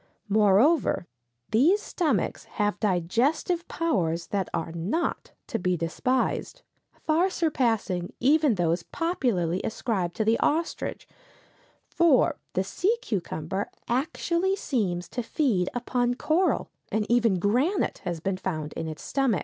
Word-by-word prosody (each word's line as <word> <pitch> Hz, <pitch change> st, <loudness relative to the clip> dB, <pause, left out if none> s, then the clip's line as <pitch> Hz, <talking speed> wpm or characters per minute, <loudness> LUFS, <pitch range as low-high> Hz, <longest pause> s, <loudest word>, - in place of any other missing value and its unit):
Moreover, 210 Hz, -, +4 dB, 0.5 s
these 310 Hz, -, +4 dB
stomachs 350 Hz, -6 st, -1 dB
have 210 Hz, -2 st, +1 dB
digestive 235 Hz, -, +1 dB
powers 175 Hz, -, 0 dB
that 195 Hz, -3 st, -1 dB
are 165 Hz, 0 st, -3 dB
not 180 Hz, -, -2 dB
to 230 Hz, -, -3 dB
be 180 Hz, 0 st, 0 dB
despised, 255 Hz, -, -1 dB, 0.4 s
far 330 Hz, +4 st, +3 dB
surpassing 230 Hz, -, 0 dB
even 290 Hz, -1 st, +4 dB
those 170 Hz, -1 st, +1 dB
popularly 200 Hz, -, -1 dB
ascribed 195 Hz, -6 st, -2 dB
to 220 Hz, -, 0 dB
the 225 Hz, +1 st, +3 dB
ostrich, 325 Hz, +3 st, -1 dB, 0.8 s
for 325 Hz, -2 st, +3 dB, 0.2 s
the 185 Hz, -, +1 dB
sea 390 Hz, -, 0 dB
cucumber 190 Hz, -1 st, -3 dB, 0.2 s
actually 340 Hz, +8 st, 0 dB
seems 195 Hz, -, -1 dB
to 245 Hz, -, -3 dB
feed 225 Hz, -, 0 dB
upon 245 Hz, 0 st, 0 dB
coral, 325 Hz, +8 st, +1 dB, 0.2 s
and 215 Hz, -1 st, 0 dB
even 230 Hz, -5 st, +3 dB
granite 250 Hz, -, +1 dB
has 175 Hz, -2 st, -4 dB
been 190 Hz, +3 st, -2 dB
found 155 Hz, -6 st, -4 dB
in 165 Hz, -, -4 dB
its 155 Hz, -1 st, -7 dB
stomach. 265 Hz, -9 st, +1 dB
225 Hz, 125 wpm, -26 LUFS, -, 0.8 s, Moreover